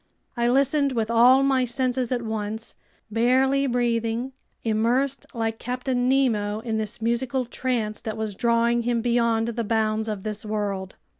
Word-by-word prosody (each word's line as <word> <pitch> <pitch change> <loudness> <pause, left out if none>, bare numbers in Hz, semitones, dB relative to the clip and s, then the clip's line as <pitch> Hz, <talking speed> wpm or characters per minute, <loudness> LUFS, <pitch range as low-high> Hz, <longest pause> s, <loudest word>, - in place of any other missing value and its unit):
I 235 -1 +1
listened 275 +2 +2
with 225 -2 -1
all 250 +3 +6
my 265 -2 +3
senses 250 0 -1
at 245 -2 -1
once, 220 0 -4 0.4
barely 260 +5 +2
breathing, 235 0 0 0.3
immersed 240 +5 0
like 225 -1 -2
Captain 250 0 -1
Nemo 220 -6 +1
in 225 -2 -2
this 220 +1 -4
musical 245 +2 0
trance 230 -3 -2
that 220 -1 -5
was 220 -1 -3
drawing 235 +2 +2
him 235 0 0
beyond 235 -1 +1
the 235 0 -2
bounds 220 0 0
of 205 -3 -4
this 215 -1 -3
world. 205 -3 -3
235 Hz, 150 wpm, -24 LUFS, 220-250 Hz, 0.4 s, all